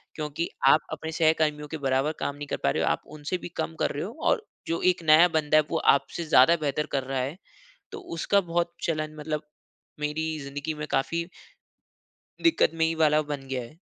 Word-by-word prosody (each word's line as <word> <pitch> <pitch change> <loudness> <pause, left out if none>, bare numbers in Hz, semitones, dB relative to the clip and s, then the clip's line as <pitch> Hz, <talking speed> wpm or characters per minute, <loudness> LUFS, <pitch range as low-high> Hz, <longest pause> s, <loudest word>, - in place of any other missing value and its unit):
क्योंकि 150 +2 -3 0.2
आप 150 +3 +6
अपने 160 +1 -5
सहकर्मियों 155 -2 +1
के 160 - -4
बराबर 135 +1 +1
काम 140 - -2
नहीं 145 0 -7
कर - - -2
पा - - +3
रहे - - 0
हो, - - +2
आप - - 0 0.2
उनसे 150 +5 -3
भी 175 - -8
कम 165 - -4
कर - - +1
रहे 145 - -3
हो। 210 - -6 0.2
और 440 - +1 0.2
जो 165 - -1
एक 175 - -14
नया 160 +2 +7
बंदा 155 0 +3
है, 155 - +5
वो - - +1 0.2
आपसे 170 +4 -4
ज़्यादा 155 +1 +6
बेहतर 145 +2 0
कर 135 - -1
रहा 135 0 -2
है।" 135 +6 -3 0.6
तो - - -6 0.2
उसका 200 +5 +3
बहुत 170 -1 -1
चलन 155 -2 -2
मतलब 150 0 -3 0.6
मेरी 150 +2 -1
जिंदगी 140 +3 -4
में 150 0 -5
काफ़ी 165 +5 0 1.2
दिक्कतमयी 165 - +2
वाला 155 0 +4
बन 140 -2 -4
गया 130 -1 -2
है। 120 +7 -12
155 Hz, 200 wpm, -26 LUFS, 145-165 Hz, 1.2 s, नया